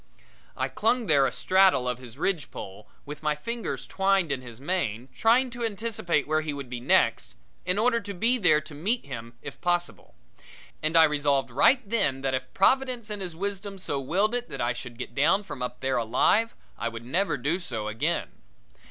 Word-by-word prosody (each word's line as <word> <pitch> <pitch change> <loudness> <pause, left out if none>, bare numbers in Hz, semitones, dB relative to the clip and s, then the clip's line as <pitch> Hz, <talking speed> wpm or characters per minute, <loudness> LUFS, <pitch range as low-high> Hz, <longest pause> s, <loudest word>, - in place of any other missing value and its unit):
I - - 0
clung 235 +2 +1
there 140 -6 +4
astraddle 185 -9 +3
of 125 -1 -2
his 125 -1 -12
ridge 170 -1 -1
pole, 100 +2 -9 0.2
with 150 0 -8
my 150 -1 +1
fingers 230 +10 -4
twined 195 -4 +1
in 135 -2 -1
his 120 -2 -11
mane, 135 - -2
trying 245 +3 +3
to 240 0 -5
anticipate 205 -8 -1
where 155 +1 +2
he 155 -2 -3
would 140 -3 -7
be 125 - -3
next, 120 - +2 0.3
in 180 +2 +1
order 235 +2 +3
to 205 -2 -7
be 235 +7 +1
there 155 -6 +4
to 155 0 -12
meet 205 +12 -1
him 115 -3 -8
if 145 - -9
possible; 175 0 -2 0.7
and 155 +2 +2
I 165 - +9
resolved 145 -4 +2
right 240 - +4
then 195 - +1
that, 135 -1 0
if 130 0 -3
Providence 250 0 +2
in 210 - -3
His 180 -4 -5
wisdom 200 +2 -4
so 145 -6 -2
willed 190 - +1
it 245 0 -2
that - - -7
I 120 +1 +1
should 120 0 -8
get 125 - -7
down 190 +9 +3
from 185 - -8
up 125 0 -4
there 130 0 0
alive, 125 - +2 0.2
I 115 - -1
would 115 0 -9
never 170 +4 0
do 145 +8 -1
so 115 - -4
again. 110 +1 -1
155 Hz, 195 wpm, -27 LUFS, 130-205 Hz, 0.7 s, I